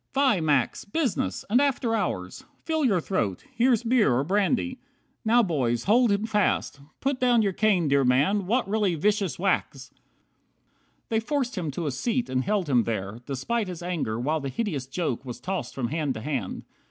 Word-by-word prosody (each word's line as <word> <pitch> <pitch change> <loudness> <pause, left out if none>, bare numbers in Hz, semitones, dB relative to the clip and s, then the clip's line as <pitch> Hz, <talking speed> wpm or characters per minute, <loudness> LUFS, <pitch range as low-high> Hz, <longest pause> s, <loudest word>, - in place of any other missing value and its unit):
Fie, 265 -9 +3
Max. 145 -5 +1
Business! 205 - -2
And 245 +6 +3
after 265 -4 +1
hours! 95 - -2 0.2
Fill 320 -2 0
your 200 -8 +3
throat; 110 - -2
Here's 240 -1 +3
beer 235 - +3
or 130 - +1
brandy. 210 - 0 0.4
Now, 235 +2 +4
boys, 125 - 0
hold 235 +2 +4
him 200 +2 +1
fast. 210 -9 0 0.2
Put 270 -1 0
down 245 -3 +4
your 200 -2 0
cane, 190 -5 +2
dear 140 -1 +3
man. 145 +11 +2
What 240 +3 +1
really 200 -3 +1
vicious 200 +2 0
whacks!" 170 -7 -1
50 - - -37 1.1
They 220 - +2
forced 255 +1 -2
him 175 -6 -2
to 160 +4 -4
a 145 - 0
seat, 235 - -1
and 130 0 +1
held 200 -2 0
him 125 -5 +3
there, 110 0 -3
Despite 205 - -2
his 175 -2 -7
anger, 160 -11 -2
while 150 +6 0
the 140 -2 -4
hideous 150 - -3
joke 135 -4 -2
Was 125 -3 -7
tossed 185 -10 -4
from 125 -3 -2
hand 150 -3 -1
to 110 - -6
hand. 140 +2 -3
185 Hz, 185 wpm, -26 LUFS, 135-230 Hz, 1.1 s, Now